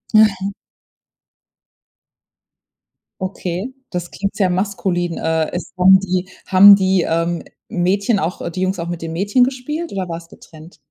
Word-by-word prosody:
Aha. 200 -3 +4 2.7
Okay, 185 +5 -4 0.2
das 175 -1 -5
klingt 195 0 -4
sehr 190 -3 +1
maskulin. 180 -2 -1
Äh, 160 -1 0
es 175 - -6
haben 190 +1 +7
die 185 -1 -2 0.2
haben 200 +2 +8
die, 190 -1 +2
ähm, 165 +1 -1 0.3
Mädchen 195 +4 +1
auch, 175 0 -3
äh - - -4
die 185 +3 -5
Jungs 185 +1 0
auch 170 - -4
mit 175 -1 -5
den 165 0 -5
Mädchen 205 +8 +2
gespielt 275 +6 -3
oder 190 -2 -3
war's 165 0 -7
getrennt? 160 +2 -15
185 Hz, 145 wpm, -19 LUFS, 175-200 Hz, 2.7 s, haben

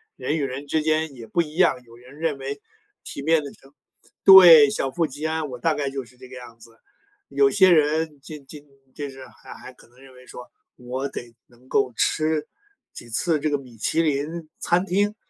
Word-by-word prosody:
人 155 - -3
与 145 - -2
人 135 +2 -5
之 155 +2 0
间 155 -1 -1
也 115 -3 -11
不 170 +10 0
一 155 -1 -7
样， 170 -8 +2
有 115 -1 -18
人 125 +5 -16
认 160 -4 -2
为 140 +1 -7 0.4
体 140 - -8
面 160 +1 +2
的 140 - -8
成 135 +1 -22 0.5
对， 170 -7 +9
小 135 -1 -3
富 165 +1 -1
即 145 +3 -8
安， 160 -1 -2
我 125 -1 -8
大 160 +4 +1
概 140 -2 -3
就 135 -2 -6
是 125 +1 -22
这 130 0 -13
个 130 - -12
样 120 -2 -13
子。 115 +1 -16 0.6
有 415 -1 +3
些 190 - +4
人 155 -1 +1
进 145 -1 -11
进 145 +1 -12 0.3
就 145 -1 -6
是 135 -1 -12
还 - - -14
还 130 - -13
可 - - -21
能 120 - -27
认 135 -1 -17
为 125 0 -18
说 125 - -11 0.3
我 125 +2 -5
得 120 -3 -9
能 125 +1 -24
够 125 - 0
吃 155 -1 0 0.5
几 - - -11
次 155 +7 0
这 155 +1 -1
个 145 - 0
米 125 -4 -15
其 160 - 0
林 155 +2 -3
餐 180 +2 0
厅， 205 +3 0
145 Hz, 230 characters per minute, -23 LUFS, 130-160 Hz, 0.6 s, 对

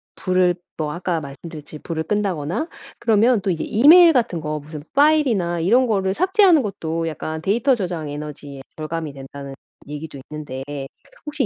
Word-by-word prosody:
불을 185 -1 +2 0.2
뭐 150 -2 -2
아까 175 -1 -2
말씀드렸듯이 150 +2 -9
불을 160 0 -4
끈다거나 195 - -1 0.3
그러면 230 +1 +3
또 190 - 0
이제 165 -3 -2
이메일 325 +9 +7
같은 230 - 0
거 155 0 -3
무슨 150 0 -9
파일이나 265 - +3
이런 230 +10 +4
거를 195 -4 0
삭제하는 370 -4 +4
것도 165 -5 -3
약간 160 0 -4
데이터 235 +8 +2
저장 175 -8 -4
에너지에 145 -2 -8
절감이 155 -1 -4
된다는 140 0 -9 0.4
얘기도 145 -1 -7
있는데 145 -4 -6 0.6
혹시 295 -3 -1
175 Hz, 365 characters per minute, -21 LUFS, 150-230 Hz, 0.6 s, 이메일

